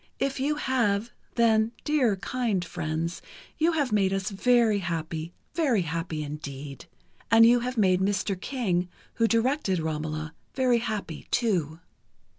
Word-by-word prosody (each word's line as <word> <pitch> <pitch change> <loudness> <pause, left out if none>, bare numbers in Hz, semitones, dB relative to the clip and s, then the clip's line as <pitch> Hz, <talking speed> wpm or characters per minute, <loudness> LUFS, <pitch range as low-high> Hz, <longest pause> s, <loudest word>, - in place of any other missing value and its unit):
If 275 0 -1
you 290 +3 +1
have, 235 -6 0 0.2
then, 225 -1 +3
dear, 275 -9 +2
kind 210 -3 -1
friends, 165 0 -3 0.4
you 330 +2 +3
have 290 -6 0
made 195 -3 +2
us 195 +1 -1
very 225 +1 +3
happy, 165 -2 -3 0.2
very 265 - +2
happy 165 -1 -3
indeed... 140 -2 -7 0.4
and 225 0 +7
you 240 +1 +6
have 250 +1 -4
made 185 -4 +4
Mr. 200 0 0
King, 185 -10 -1 0.3
who 230 - +6
directed 230 -3 +1
'Romola,' 155 0 -3 0.2
very 255 -3 +3
happy, 215 -8 -4
too." 175 - 0
200 Hz, 135 wpm, -27 LUFS, 165-245 Hz, 0.4 s, and